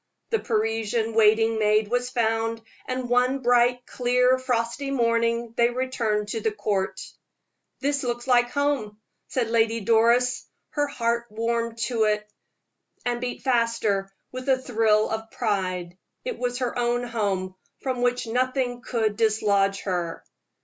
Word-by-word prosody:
The 450 - +2
Parisian 225 0 -1
waiting 225 0 +4
maid 215 0 +3
was 245 +1 0
found 225 -1 0 0.2
and 255 -1 -3
one 250 +2 +2
bright, 245 0 +3
clear, 250 +1 +2
frosty 250 +2 -1
morning 230 -2 +1
they 235 0 +4
returned 235 -4 -1
to 225 - -2
the 220 - +1
Court. 205 -2 -2 0.8
"It 280 0 0
looks 240 -1 -3
like 245 -2 +4
home," 255 -6 -1 0.3
said 235 -3 -1
Lady 230 0 +2
Doris. 235 +4 +3 0.2
Her 290 -1 0
heart 235 -3 -1
warmed 230 +1 -2
to 225 -1 +1
it, 210 0 0 0.8
and 240 0 -1
beat 250 0 -4
faster 230 -6 +1 0.2
with 255 +2 -5
a 265 - +5
thrill 220 -4 +2
of 220 0 -4
pride. 185 -6 -2 0.3
It - - -4
was 245 0 -1
her 250 -2 -2
own 240 0 +1
home, 200 -6 -2 0.3
from 255 -2 -2
which 245 0 +1
nothing 250 +1 -1
could 225 -3 -1
dislodge 205 -3 +2
her! 175 -3 -3
230 Hz, 140 wpm, -25 LUFS, 220-250 Hz, 0.8 s, a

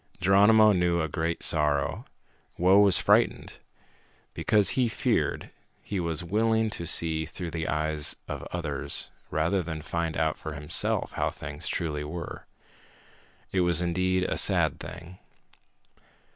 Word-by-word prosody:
Geronimo 105 +3 +5
knew 90 -3 +1
a 80 - -1
great 80 +2 -3
sorrow. 75 -3 +1 0.5
Whoa 95 +3 +4
was 100 -4 +5
frightened. - - +1 0.7
Because 105 -2 +2
he 125 -3 +1
feared, - - -1 0.3
he 100 - -4
was 85 -1 -1
willing 110 +4 +1
to 85 - -5
see 80 -1 +1
through 85 +1 -6
the 80 -1 -4
eyes 75 -1 0
of - - -5
others 80 -5 -3 0.2
rather 80 +5 0
than 80 -3 -6
find 85 -1 -3
out 80 -1 -1
for 80 - -6
himself 75 0 -1
how - - -1
things - - -8
truly 75 -3 -3
were. 80 +2 -7 1.0
It 95 - +1
was 85 -2 +3
indeed 95 +1 0
a - - -2
sad - - +4
thing. 90 +2 -10
85 Hz, 135 wpm, -27 LUFS, 80-95 Hz, 1.0 s, Geronimo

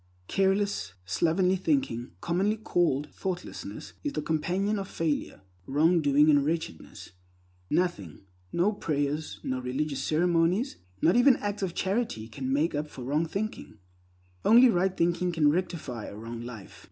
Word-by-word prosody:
Careless, 195 - 0
slovenly 180 - +2
thinking, 190 - -1
commonly 195 +6 +1
called 160 -8 0
thoughtlessness, 185 -2 -6
is 290 - -2
the - - -2
companion 185 +7 0
of 195 - -5
failure, 160 - -2 0.3
wrongdoing, 150 0 +4
and 145 -2 +5
wretchedness. 160 - -4 0.6
Nothing, 150 - -1 0.3
no 185 +5 +2
prayers, 150 -4 -2
no 130 0 -2
religious 135 +2 -2
ceremonies, 175 - +1 0.3
not 170 - +5
even 245 +2 +6
acts 205 -2 -3
of 185 -3 -2
charity, 190 - -1
can 130 +4 -4
make 150 +5 +1
up 150 +1 -2
for 130 - -9
wrong 150 +6 0
thinking. 200 - -5 0.7
Only 245 +3 +7
right 190 -2 +1
thinking 175 +1 +1
can 155 -3 +3
rectify 155 - -3
a - - -8
wrong 115 +1 -7
life. 120 -4 -9
165 Hz, 140 wpm, -28 LUFS, 140-190 Hz, 0.7 s, Only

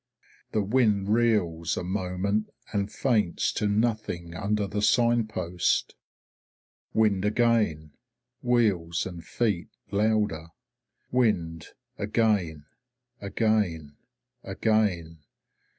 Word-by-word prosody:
The 105 - +1
wind 105 -3 +2
reels 100 -8 +1
a - - -2
moment 95 +3 -1 0.2
and 100 -1 -1
faints 110 -10 +1
to 105 - 0
nothing 105 -6 -1
under 105 +3 -1
the 105 +1 -3
sign 120 0 +3
post. 90 -5 -1 1.0
Wind 105 -4 +2
again, 105 -8 +1 0.5
wheels 100 -9 +1
and 85 -3 -7
feet 105 -3 -1 0.2
louder. 105 -6 +1 0.6
Wind 85 -10 0 0.3
again 100 -8 0 0.6
again 100 -8 0 0.5
again. 90 -8 0
105 Hz, 85 wpm, -27 LUFS, 85-110 Hz, 1.0 s, sign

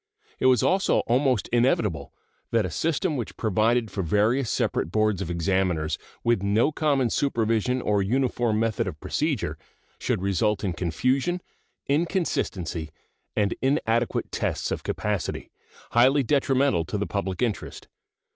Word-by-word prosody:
It - - +3
was 125 -3 +4
also 190 +1 +3
almost 125 -2 +1
inevitable 105 - +1 0.4
that 115 -3 +2
a 90 - -4
system 160 - 0
which 120 - -5
provided 110 +1 +1
for 100 - -2
various 105 - +1
separate 80 - -1
boards 110 -2 +1
of 90 - -4
examiners, 85 -3 0 0.2
with 115 -4 +2
no 105 +8 +2
common 140 -6 +1
supervision 120 -1 0
or 105 -1 +2
uniform 120 0 +1
method 115 -1 0
of 75 -5 -6
procedure, 150 - -2 0.4
should 90 - -1
result 100 +2 +1
in 95 -3 -1
confusion, 130 - 0 0.5
inconsistency, 140 - -1 0.5
and 105 -2 +1
inadequate 120 -4 0
tests - - -2
of - - -2
capacity, - - -3 0.4
highly 130 +4 +4
detrimental 135 - +2
to 105 - -3
the 105 - -1
public 100 +2 -2
interest. 115 -4 -3
115 Hz, 135 wpm, -25 LUFS, 100-130 Hz, 0.5 s, was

